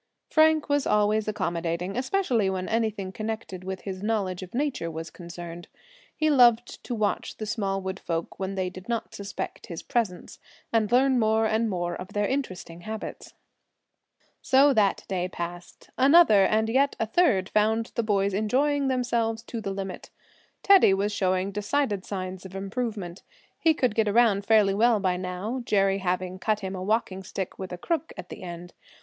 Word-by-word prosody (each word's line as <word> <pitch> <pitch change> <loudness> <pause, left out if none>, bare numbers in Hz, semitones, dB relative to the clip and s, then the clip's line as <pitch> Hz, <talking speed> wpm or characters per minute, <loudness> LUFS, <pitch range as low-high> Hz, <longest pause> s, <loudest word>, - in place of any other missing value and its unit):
Frank 315 -1 +4
was 285 -1 +1
always 210 +1 +2
accommodating, 175 -3 -2
especially 255 - +1
when 185 -1 -3
anything 220 -4 -1
connected 215 -3 -5
with 190 0 -5
his 190 -2 -6
knowledge 200 -4 -1
of 185 +3 -9
nature 270 - -1
was 160 0 -6
concerned. 175 -1 -9 0.5
He 310 - +1
loved 240 -3 +4
to 245 - -3
watch 210 -2 -1
the 215 - -4
small 200 -3 -2
woods 190 0 -5
folk 165 -1 -4
when 195 0 -3
they 185 -1 -1
did 185 +4 -11
not 235 -1 -2
suspect 200 0 -6
his 170 -2 -7
presence, 210 -7 -2 0.3
and 220 -1 +2
learn 260 +1 +4
more 220 0 +2
and 220 +1 +1
more 175 -2 -2
of 185 - -9
their 205 0 +1
interesting 185 -10 -4
habits. 215 +2 -7 1.1
So 275 +2 +5
that 205 -5 +2
day 180 -2 -1
passed. 175 0 -8
Another, 265 - +6
and 220 +2 +2
yet 270 +5 +2
a 225 - +1
third 220 - +2
found 220 +2 +1
the 235 - 0
boys 200 -3 +1
enjoying 270 +8 +1
themselves 235 -3 0
to 235 -1 -6
the 200 - -4
limit. 195 -1 -5 0.5
Teddy 385 - +6
was 200 +2 0
showing 185 0 0
decided 210 0 -1
signs 185 -2 -5
of 190 0 -10
improvement. 195 -2 -4 0.4
He 320 -1 +3
could 255 -6 +1
get 220 -1 +1
around 205 -2 +3
fairly 215 -3 +5
well 225 +2 +3
by 185 -2 0
now, 185 +7 -4
Jerry 195 -3 +2
having 185 0 -2
cut 215 +2 0
him 190 0 -4
a 185 - -5
walking 195 -1 -1
stick, 190 0 -6
with 190 -1 -6
a 180 - -5
crook 325 - -2
at 180 - -8
the - - -9
end. 175 -1 -8
205 Hz, 175 wpm, -26 LUFS, 185-230 Hz, 1.1 s, Another